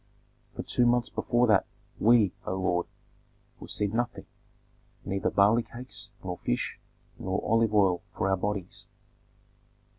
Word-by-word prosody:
For - - -4
two 120 - +2
months 120 0 +2
before 120 +3 +1
that, 105 -4 +3 0.3
we, 110 -4 +5
O 95 - -1
lord, 90 -2 0 0.7
received 105 0 -2
nothing, 120 +1 -2 0.8
neither 95 0 0
barley 105 +4 +4
cakes, 125 +2 -9
nor 90 -2 -4
fish, - - -2 0.4
nor 95 +1 -1
olive 115 0 +2
oil 95 -4 +4
for - - 0
our 95 - +3
bodies." 100 -1 -4
105 Hz, 125 wpm, -28 LUFS, 95-115 Hz, 0.8 s, we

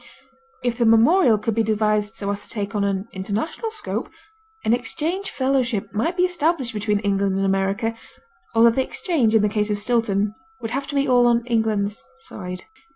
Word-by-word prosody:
If 245 -1 -1
the 235 - +3
memorial 230 - +5
could 225 +2 -2
be 225 - +1
devised 215 -1 0
so 200 -1 -3
as 200 0 -4
to - - -9
take 205 -1 -2
on 205 -1 0
an 200 +1 -1
international 210 - -3
scope, 435 -1 -4 0.6
an 220 - +3
exchange 330 - -1
fellowship 260 -5 -1
might 285 - -1
be 360 - +3
established 335 -8 0
between 210 -1 0
England 200 -1 0
and 195 0 0
America, 195 +4 0 0.6
although 230 +1 +6
the 265 - +1
exchange, 265 - 0
in 215 - +4
the - - +4
case 210 0 -1
of 210 - 0
Stilton, 210 -2 +1 0.3
would 225 -2 -5
have 275 +2 -2
to 290 - -5
be 280 0 +2
all 245 -1 +5
on 235 0 +2
England's 220 -3 0
side. 180 +2 -7
225 Hz, 185 wpm, -22 LUFS, 205-255 Hz, 0.6 s, although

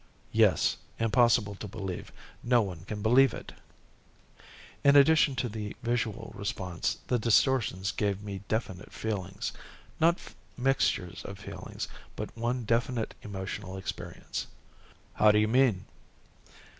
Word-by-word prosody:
"Yes, - - +4 0.2
impossible 115 -2 +3
to 105 +2 -7
believe. 95 -2 -5 0.3
No 120 -1 +4
one 90 -3 -7
can 105 0 -5
believe 130 +4 +5
it."_ - - -9 1.3
"In 140 0 +6
addition 145 -1 +6
to 125 +1 -1
the 105 -2 -5
visual 120 -3 -1
response, 100 -4 -2
the 125 - +1
distortions 110 -4 +2
gave 100 -1 -1
me 100 -2 -5
definite 105 -4 -3
feelings. 100 -3 -3 0.5
Not 170 +2 +4 0.4
mixtures 125 -9 +1
of 100 - -7
feelings, - - -6 0.3
but - - -6
one 120 +2 -1
definite 115 +1 0
emotional 95 -1 -5
experience." 95 - -5 0.7
"How 105 0 +6
do 105 - +3
you 105 0 +4
mean?" 115 -5 +3
110 Hz, 120 wpm, -29 LUFS, 100-120 Hz, 1.3 s, In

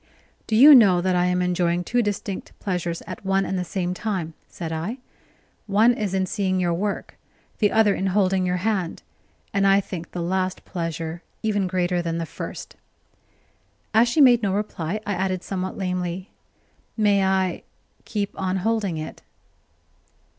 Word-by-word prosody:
"Do 220 - 0
you 285 +7 +10
know 200 -9 +7
that 185 +1 +1
I 180 0 +3
am 180 0 +1
enjoying 175 -1 +1
two 245 +7 +1
distinct 205 -2 -4
pleasures 175 -3 -3
at - - -8
one 195 0 +1
and 190 - -2
the 180 - -1
same 180 +1 -2
time?" 185 -5 -3
said 165 -2 -6
I. 170 +10 -3 0.7
"One 215 +4 +4
is 205 -4 -2
in 190 0 +1
seeing 185 -1 -1
your 175 -2 +1
work, 200 +4 -3 0.4
the 210 -2 +3
other 220 -2 +4
in 195 - -1
holding 190 -1 +2
your 180 0 0
hand; 195 -6 -1 0.5
and 200 -1 +3
I 195 0 +5
think 175 -4 -6
the 175 - -4
last 185 +1 -2
pleasure 165 -1 -4 0.2
even 205 -3 +1
greater 180 -1 0
than 165 -1 -2
the 165 - -2
first." - - -8 1.2
As 230 +2 +5
she 300 +5 +3
made 245 -4 +7
no 200 -3 0
reply, 200 -2 -2
I 205 - -1
added 185 -1 -1
somewhat 190 -1 -4
lamely: 180 0 -3 0.7
"May 205 -2 +3
I 190 -1 +1 0.4
keep 205 -2 -3
on 190 0 0
holding 215 -7 0
it?" 155 0 -7
190 Hz, 165 wpm, -23 LUFS, 180-205 Hz, 1.2 s, you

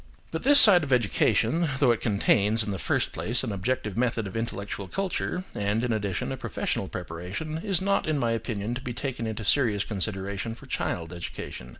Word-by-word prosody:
But 160 - -3
this 285 +2 +8
side 185 - +9
of 140 - -5
education, 130 - +2
though 135 -4 +4
it 115 - -1
contains, 105 0 +3
in 105 - -3
the 95 - -4
first - - 0
place, 120 +4 -1
an 120 - -2
objective 105 +2 -2
method 115 -2 0
of 95 - -7
intellectual 100 -3 -4
culture, 185 - -2
and, 105 +3 -1
in 120 -2 0
addition, 100 -4 -2
a - - -4
professional - - -3
preparation, 95 - -5
is 190 -1 0
not, 200 -3 +1
in 155 -1 +1
my 120 -4 0
opinion, 115 -1 -3
to 125 - -5
be 125 -2 -5
taken 120 -3 -3
into 110 0 -4
serious 105 -1 +2
consideration 100 +1 -3
for - - -14
child 85 0 -3
education. 85 -7 -7
115 Hz, 195 wpm, -27 LUFS, 100-130 Hz, -, side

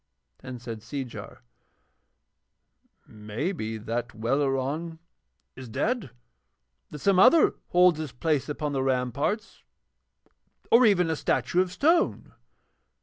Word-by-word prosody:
Then 130 -1 -8
said 115 -2 -7
Seejar: 125 +2 -7 1.6
'Maybe 110 - -4
that 115 +2 -4
Welleran 135 +7 -1 0.6
is 130 -2 -10
dead 235 - -1
and - - -13 0.8
that 150 - -8
some 190 +5 +2
other 280 - +6
holds 180 -2 +4
his 155 -4 -5
place 150 +4 -1
upon 150 0 -3
the 135 - 0
ramparts, 135 - -2 1.1
or 235 +1 +7
even 180 -5 +3
a - - 0
statue 175 +3 +1
of 185 -1 -2
stone.' 330 - +1
145 Hz, 110 wpm, -26 LUFS, 120-180 Hz, 1.6 s, or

